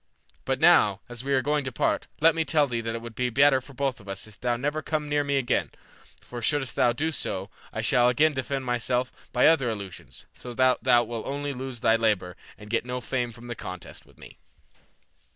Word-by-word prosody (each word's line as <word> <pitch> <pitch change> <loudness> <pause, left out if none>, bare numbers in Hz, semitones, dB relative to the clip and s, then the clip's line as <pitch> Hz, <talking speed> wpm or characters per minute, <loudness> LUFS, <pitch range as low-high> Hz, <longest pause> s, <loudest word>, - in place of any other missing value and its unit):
But - - 0
now, 100 -1 +5
as 120 0 -6
we 140 - -3
are 130 -2 +3
going 150 +1 +1
to 130 - -4
part, - - 0
let 160 +2 +6
me 165 0 0
tell 155 -2 +3
thee 120 -4 -3
that 115 0 -3
it 115 - -6
will 115 - -7
be 125 +2 -1
better 135 +2 +4
for 140 +2 -14
both 135 -1 -1
of 100 -2 -13
us 95 0 -5
if 110 -2 -14
thou 120 -1 0
never 145 +5 -2
come 155 -1 -2
near 145 0 +1
me 140 -1 0
again, 125 -3 0 0.5
for 120 -1 -8
shouldst 135 +2 0
thou 120 - +4
do 155 +7 -1
so, 95 -9 -4 0.2
I - - -3
shall 125 0 +4
again 150 +5 +3
defend 135 0 -3
myself 125 +1 0 0.2
by 125 - +3
other 145 -6 +4
illusions, 100 -4 -7
so 125 -1 -9
that 130 0 +3
thou 120 -2 +5
wilt 115 -1 -5
only 145 +1 -3
lose 130 -2 -6
thy 115 0 +4
labor 100 -6 0 0.2
and 105 - -12
get 115 - +1
no 125 +1 -4
fame 125 -1 -2
from 115 +1 -13
the 120 - -4
contest 90 -5 -9
with - - -22
me." - - -14
125 Hz, 225 wpm, -26 LUFS, 115-140 Hz, 0.5 s, let